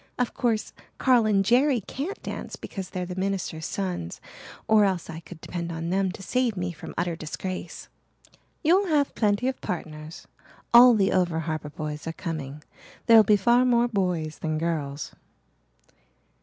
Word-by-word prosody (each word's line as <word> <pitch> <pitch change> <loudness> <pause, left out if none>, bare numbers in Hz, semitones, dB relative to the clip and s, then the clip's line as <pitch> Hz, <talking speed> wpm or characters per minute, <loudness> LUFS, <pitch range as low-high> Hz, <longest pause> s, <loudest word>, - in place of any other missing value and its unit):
Of 250 -1 -1
course 225 -3 -1 0.2
Carl 245 -4 +4
and 195 -2 +2
Jerry 255 +4 +4
can't 290 - -5
dance - - -6
because 190 -2 -7
they're 180 -1 -4
the 180 - -6
minister's 185 -4 -2
sons, 180 - -4 0.5
or 220 -1 +5
else 185 -4 0
I 160 - -7
could 170 0 -12
depend 170 -1 -5
on 165 +1 -4
them 190 0 +1
to 195 - -10
save 245 -1 0
me 180 0 -2
from 160 - -10
utter 175 -1 -1
disgrace." 185 +4 -6 0.8
"You'll 370 +5 +4
have 295 -4 +2
plenty 210 +3 +1
of 265 - -3
partners 155 -4 -6 0.5
all 240 0 +9
the 195 -2 +2
over 175 -3 +1
harbour 155 -1 -4
boys 150 +1 -6
are 165 - -3
coming 150 -4 -6 0.4
there'll 230 -1 +8
be 210 0 +4
far 240 +5 +4
more 240 -1 +3
boys 180 -8 -1
than 155 -1 -2
girls." 155 -3 -3
185 Hz, 160 wpm, -26 LUFS, 165-230 Hz, 0.8 s, all